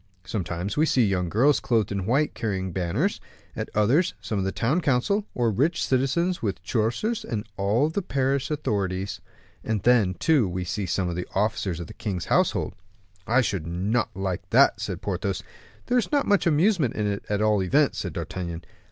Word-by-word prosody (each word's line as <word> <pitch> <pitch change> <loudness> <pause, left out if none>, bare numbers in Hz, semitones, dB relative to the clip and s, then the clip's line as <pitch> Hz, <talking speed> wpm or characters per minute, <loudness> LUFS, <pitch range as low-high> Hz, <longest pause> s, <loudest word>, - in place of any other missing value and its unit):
Sometimes 95 - -3
we 155 +2 +4
see 125 -5 +3
young 90 -3 0
girls 135 - +3
clothed 110 -5 +1
in 100 -2 -2
white 140 +6 +2
carrying 95 -5 -2
banners; 95 - -1 0.3
at - - -4
others, 120 - +3
some 100 +1 -3
of - - 0
the 95 - -1
town 135 - 0
council, 160 - +1
or 120 -2 +2
rich 145 - +1
citizens, 135 +8 +1
with 95 -5 -3
choristers 125 - -1
and 110 - -4
all 105 +9 +2
the 160 +6 -2
parish 135 -4 0
authorities; 100 -10 -2 0.4
and 110 -4 -2
then, 110 -7 +4
too, 140 - +2
we 90 +1 -3
see 100 +2 -3
some 90 +1 0
of 85 - -3
the 90 - -4
officers 100 -4 0
of 85 - -5
the - - -11
king's 95 -5 -4
household." - - +1 0.5
"I 120 +4 +4
should 95 -9 -2
not 100 +8 0
like 95 -2 -3
that," - - +4
said - - -4
Porthos. - - -2 0.4
"There 250 - +2
is 235 - -3
not 285 -2 +2
much 205 -3 +3
amusement 165 - +2
in 105 - -1
it, 100 -1 -2
at 105 -1 0
all 105 -2 +3
events," 140 +11 +2
said 90 -5 -4
D'Artagnan. 85 0 -5
110 Hz, 185 wpm, -25 LUFS, 95-140 Hz, 0.5 s, we